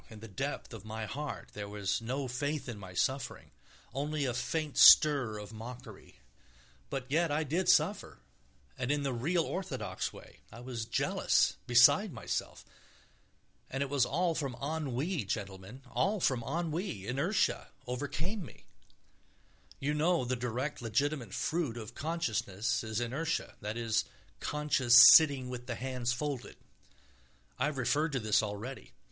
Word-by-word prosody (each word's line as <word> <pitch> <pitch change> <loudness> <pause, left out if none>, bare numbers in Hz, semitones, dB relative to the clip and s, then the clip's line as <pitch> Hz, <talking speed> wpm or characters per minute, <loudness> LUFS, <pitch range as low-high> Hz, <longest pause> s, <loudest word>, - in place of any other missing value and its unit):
In 110 -2 -11
the 115 - -9
depth 135 +6 -5
of 110 -3 -9
my 110 0 -5
heart 145 +5 -6
there 100 -1 -6
was 100 0 -2
no 130 +4 -3
faith 145 +4 -3
in 115 -4 -6
my 95 -2 -10
suffering, 130 +6 -2 0.4
only 145 +2 -2
a 125 - -1
faint 155 +4 -2
stir 140 -8 +7
of 105 +1 -9
mockery, 115 -1 -10 0.7
but 135 -2 -4
yet 165 +5 +1
I 150 +2 0
did 165 +6 0
suffer, 190 - +2 0.6
and 125 -1 -2
in 145 -1 0
the 135 -2 -1
real, 165 +9 +1
orthodox 155 - -4
way; - - -14
I 115 - -11
was 120 -2 -5
jealous, 115 - +1
beside 140 - +6
myself... - - -4 1.0
and 135 +1 -1
it 140 - -6
was 140 -3 +3
all 170 +6 +1
from 140 -5 -3
ennui, 150 - -2
gentlemen, 100 +4 -6
all 165 - +1
from 130 -8 +1
ennui; 160 - -3
inertia 140 - 0 0.2
overcame 150 - -3
me. 135 - -13 1.1
You 145 +2 -1
know 160 -1 +2
the 130 +1 -1
direct, 125 +4 -3
legitimate 120 +1 -1
fruit 155 -8 -1
of 110 -2 -8
consciousness 130 - -2
is 110 0 -3
inertia, 145 +8 -2
that 105 +2 -4
is, 115 -1 0 0.3
conscious 135 -5 +3 0.2
sitting 140 -5 +6
with 125 0 -7
the 120 - -3
hands 125 -1 -2
folded. 135 -1 -4 1.0
I 130 - +2
have 150 -2 -2
referred 145 +5 +1
to 135 - 0
this 110 -1 +2
already. 105 - -6
130 Hz, 150 wpm, -32 LUFS, 115-150 Hz, 1.1 s, stir